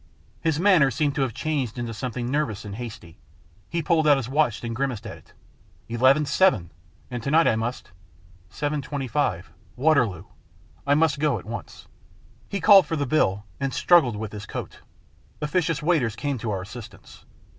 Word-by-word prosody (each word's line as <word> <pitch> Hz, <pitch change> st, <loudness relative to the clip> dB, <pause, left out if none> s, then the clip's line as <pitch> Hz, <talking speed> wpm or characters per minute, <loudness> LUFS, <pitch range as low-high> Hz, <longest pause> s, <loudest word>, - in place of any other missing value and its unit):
His 160 Hz, -2 st, 0 dB
manner 180 Hz, -7 st, +5 dB
seemed 145 Hz, +3 st, 0 dB
to 145 Hz, -, -2 dB
have 135 Hz, -3 st, 0 dB
changed 135 Hz, -7 st, -2 dB
into 120 Hz, -1 st, -4 dB
something 120 Hz, +1 st, -4 dB
nervous 125 Hz, -9 st, -1 dB
and 100 Hz, -, -6 dB
hasty. 105 Hz, -8 st, -9 dB, 0.5 s
He 170 Hz, 0 st, -2 dB
pulled 160 Hz, -1 st, +2 dB
out 145 Hz, -2 st, +6 dB
his 125 Hz, -4 st, -3 dB
watch 135 Hz, -4 st, 0 dB
and 115 Hz, -1 st, -4 dB
grimaced 130 Hz, -4 st, -2 dB
at -, -, -7 dB
it. -, -, -20 dB, 0.3 s
" -, -, -33 dB
Eleven 135 Hz, +5 st, +4 dB
seven! 140 Hz, -, +2 dB, 0.4 s
And 120 Hz, -1 st, -4 dB
to 140 Hz, -, -3 dB
night 160 Hz, +3 st, +4 dB
I -, -, +3 dB
must 115 Hz, -2 st, -4 dB, 0.6 s
Seven 145 Hz, +6 st, -2 dB
twenty 140 Hz, 0 st, -4 dB
five. 105 Hz, -, -1 dB, 0.2 s
Waterloo! 125 Hz, -, +2 dB, 0.6 s
I 145 Hz, -, +4 dB
must 155 Hz, -2 st, +2 dB
go 145 Hz, -4 st, +1 dB
at 95 Hz, -, -10 dB
once." 115 Hz, +2 st, -8 dB, 0.6 s
He 200 Hz, -, -2 dB
called 195 Hz, +1 st, +7 dB
for 165 Hz, -, -2 dB
the 145 Hz, -2 st, -1 dB
bill, 105 Hz, -8 st, +1 dB
and 135 Hz, -1 st, -2 dB
struggled 160 Hz, -11 st, +4 dB
with 105 Hz, 0 st, -5 dB
his 105 Hz, -1 st, -8 dB
coat. -, -, -7 dB, 0.6 s
Officious 150 Hz, -1 st, -1 dB
waiters 150 Hz, -10 st, +1 dB
came 140 Hz, -4 st, -3 dB
to 115 Hz, -, -4 dB
our 95 Hz, -3 st, -2 dB
assistance. 110 Hz, 0 st, -12 dB
135 Hz, 180 wpm, -24 LUFS, 115-150 Hz, 0.6 s, called